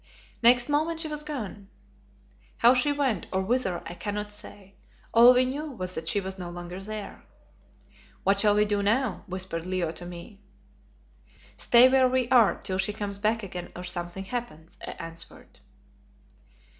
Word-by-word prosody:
Next 245 Hz, +1 st, +5 dB
moment 315 Hz, +3 st, 0 dB
she 325 Hz, -, -1 dB
was 300 Hz, -1 st, -4 dB
gone. 220 Hz, -9 st, -6 dB, 0.9 s
How 240 Hz, +2 st, +6 dB
she 260 Hz, +3 st, +2 dB
went, 270 Hz, -9 st, -1 dB
or 190 Hz, 0 st, 0 dB
whither, 205 Hz, -4 st, 0 dB
I 170 Hz, -, -6 dB
cannot 210 Hz, +2 st, -4 dB
say; 205 Hz, -1 st, -12 dB, 0.4 s
all 235 Hz, +2 st, +9 dB
we 255 Hz, 0 st, +4 dB
knew 290 Hz, +4 st, -4 dB
was 185 Hz, -5 st, -4 dB
that 160 Hz, -2 st, -5 dB
she 205 Hz, -, +2 dB
was 190 Hz, 0 st, -6 dB
no 175 Hz, -1 st, -6 dB
longer 175 Hz, +1 st, -7 dB
there. 210 Hz, +1 st, -7 dB, 1.0 s
"What 200 Hz, +1 st, +3 dB
shall 205 Hz, 0 st, +4 dB
we 210 Hz, 0 st, +4 dB
do 205 Hz, -1 st, 0 dB
now?" 230 Hz, +7 st, 0 dB
whispered 185 Hz, -2 st, -4 dB
Leo 185 Hz, -3 st, -1 dB
to 175 Hz, -, -8 dB
me. 180 Hz, +4 st, -11 dB, 1.1 s
"Stay 240 Hz, +1 st, +6 dB
where 260 Hz, 0 st, +4 dB
we 255 Hz, -1 st, +1 dB
are 240 Hz, -5 st, +5 dB
till 185 Hz, 0 st, -2 dB
she 195 Hz, +2 st, +1 dB
comes 205 Hz, -1 st, -5 dB
back 220 Hz, +2 st, 0 dB
again 180 Hz, -2 st, -7 dB
or 180 Hz, -, -7 dB
something 175 Hz, +1 st, -3 dB
happens," 190 Hz, -9 st, -7 dB
I -, -, -5 dB
answered. 165 Hz, 0 st, -11 dB
205 Hz, 165 wpm, -27 LUFS, 185-250 Hz, 1.1 s, all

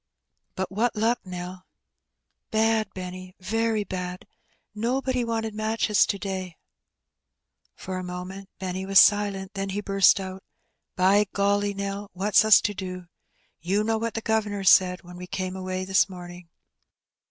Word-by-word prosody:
Bat 190 Hz, 0 st, -3 dB
what 225 Hz, +4 st, 0 dB
luck, 225 Hz, +3 st, +1 dB
Nell?" 180 Hz, 0 st, -8 dB, 0.4 s
" -, -, -55 dB
Bad, 220 Hz, -1 st, +1 dB
Benny, 185 Hz, 0 st, -7 dB
very 225 Hz, +2 st, 0 dB
bad. 180 Hz, -2 st, -5 dB, 0.5 s
Nobody 250 Hz, +3 st, -1 dB
wanted 225 Hz, -1 st, -2 dB
matches 215 Hz, 0 st, +2 dB
to 200 Hz, -, -1 dB
day," 190 Hz, -3 st, -5 dB, 1.2 s
For 185 Hz, 0 st, -5 dB
a -, -, -5 dB
moment 180 Hz, +2 st, -7 dB
Benny 185 Hz, 0 st, -4 dB
was 195 Hz, 0 st, +2 dB
silent, 205 Hz, -2 st, +3 dB
then 195 Hz, -1 st, -3 dB
he 200 Hz, +2 st, -2 dB
buret 195 Hz, -1 st, +4 dB
out, 190 Hz, 0 st, -6 dB, 0.3 s
" -, -, -55 dB
By 195 Hz, +3 st, +4 dB
golly, 200 Hz, 0 st, +1 dB
Nell! 200 Hz, 0 st, -4 dB
what's 195 Hz, +2 st, +3 dB
us 215 Hz, -1 st, +7 dB
to 205 Hz, -, -1 dB
do? 185 Hz, -2 st, -7 dB, 0.5 s
You 195 Hz, +5 st, 0 dB
know 225 Hz, 0 st, 0 dB
what 230 Hz, 0 st, -3 dB
the 225 Hz, -, -2 dB
guv'nor 215 Hz, -3 st, 0 dB
said 185 Hz, -1 st, +5 dB
when 175 Hz, 0 st, -11 dB
we 180 Hz, 0 st, -8 dB
came 185 Hz, 0 st, -4 dB
away 185 Hz, 0 st, -4 dB
this 190 Hz, +1 st, +3 dB
morning? 175 Hz, -1 st, -10 dB
195 Hz, 155 wpm, -25 LUFS, 185-210 Hz, 1.2 s, us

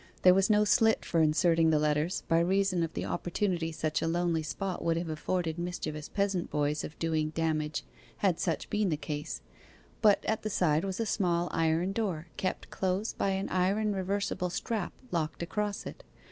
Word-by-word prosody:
There 180 Hz, -, +8 dB
was 195 Hz, +2 st, +3 dB
no 210 Hz, 0 st, +5 dB
slit 220 Hz, +1 st, +3 dB
for 165 Hz, -, +2 dB
inserting 165 Hz, +1 st, +4 dB
the 155 Hz, -, +4 dB
letters, 150 Hz, +3 st, +1 dB
by 165 Hz, -, +4 dB
reason 185 Hz, +1 st, +2 dB
of 165 Hz, -1 st, -1 dB
the -, -, -2 dB
opportunity 175 Hz, -2 st, -1 dB
such 155 Hz, -1 st, -1 dB
a -, -, 0 dB
lonely 170 Hz, -1 st, +1 dB
spot 185 Hz, +4 st, -4 dB
would 165 Hz, -1 st, +1 dB
have 170 Hz, -1 st, -3 dB
afforded 165 Hz, +1 st, -2 dB
mischievous 155 Hz, -4 st, -4 dB
peasant 195 Hz, -3 st, 0 dB
boys 150 Hz, 0 st, 0 dB
of 155 Hz, -, -7 dB
doing 160 Hz, -2 st, 0 dB
damage 155 Hz, -2 st, -1 dB, 0.3 s
had 185 Hz, -4 st, +1 dB
such 170 Hz, -3 st, -1 dB
been 210 Hz, -2 st, +1 dB
the 155 Hz, -, 0 dB
case; 150 Hz, -1 st, -4 dB, 0.6 s
but 210 Hz, -2 st, +4 dB
at 220 Hz, -, 0 dB
the 215 Hz, -, -3 dB
side 160 Hz, -5 st, +2 dB
was 190 Hz, +1 st, -3 dB
a 230 Hz, -, +1 dB
small 175 Hz, -4 st, +1 dB
iron 165 Hz, +3 st, +1 dB
door, 185 Hz, -7 st, -2 dB
kept 185 Hz, -, -3 dB
close 190 Hz, +3 st, -1 dB
by 195 Hz, -, 0 dB
an 195 Hz, 0 st, -1 dB
iron 200 Hz, +3 st, +1 dB
reversible 190 Hz, -1 st, -1 dB
strap 205 Hz, +1 st, -2 dB, 0.2 s
locked 165 Hz, -1 st, -1 dB
across 205 Hz, +3 st, -2 dB
it. -, -, -8 dB
175 Hz, 185 wpm, -30 LUFS, 160-195 Hz, 0.6 s, There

